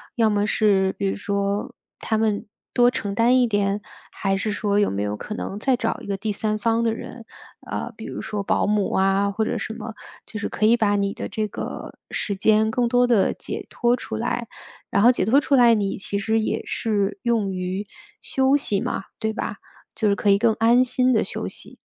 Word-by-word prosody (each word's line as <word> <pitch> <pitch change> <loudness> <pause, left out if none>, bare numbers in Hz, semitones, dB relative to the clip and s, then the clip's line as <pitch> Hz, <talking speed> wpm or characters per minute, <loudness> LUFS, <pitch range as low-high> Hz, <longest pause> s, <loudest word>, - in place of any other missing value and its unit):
要 225 -2 +3
么 205 0 +1
是 195 -3 +2
比 - - -2
如 - - -3
说 200 0 -2 0.3
他 220 - -1
们 215 -2 0 0.3
多 245 0 +5
承 205 -4 -3
担 235 +5 +4
一 250 - +4
点， 205 -2 0 0.3
还 195 -1 -1
是 210 +1 -2
说 205 -1 +1
有 205 - +3
没 100 +1 -2
有 105 0 -2
可 210 - -6
能 200 0 -5
再 265 +2 +2
找 225 -2 -2
一 - - -11
个 200 - -1
第 210 +2 -3
三 215 +1 -1
方 230 +2 +1
的 225 - +2
人， 230 +1 -9 0.4
呃， - - -3
比 - - -8
如 - - -5
说 210 -1 -3
保 195 - +1
姆 210 -1 +1
啊 195 +1 +2
或 220 +2 -1
者 - - -1
什 220 - -4
么， 225 0 -7 0.3
就 220 - -7
是 220 - -2
可 215 - -1
以 235 +2 +5
把 210 -3 +2
你 200 0 0
的 - - -5
这 215 +2 -2
个 - - -6 0.2
时 200 -2 -3
间 220 +2 +3
更 240 +1 +1
多 245 +1 +3
地 230 -5 +3
解 - - -6
脱 240 0 +2
出 110 - -6
来， 235 - -2 0.4
然 200 - +2
后 235 - +7
解 250 - -1
脱 235 +9 +4
出 285 -1 +2
来 240 -2 +6
你 200 -3 0
其 200 +1 -3
实 220 +2 +1
也 - - -2
是 205 -2 -1
用 230 -4 +1
于 185 +2 -3 0.3
休 265 +1 +2
息 210 -8 -1
嘛， - - -3
对 220 0 -1
吧？ - - -4 0.4
就 215 -2 +1
是 200 - +3
可 205 - 0
以 200 - +6
更 225 +1 +3
安 235 +3 +4
心 255 0 +2
地 220 - +3
休 - - -3
息。 - - -6
215 Hz, 240 characters per minute, -23 LUFS, 200-230 Hz, 0.4 s, 后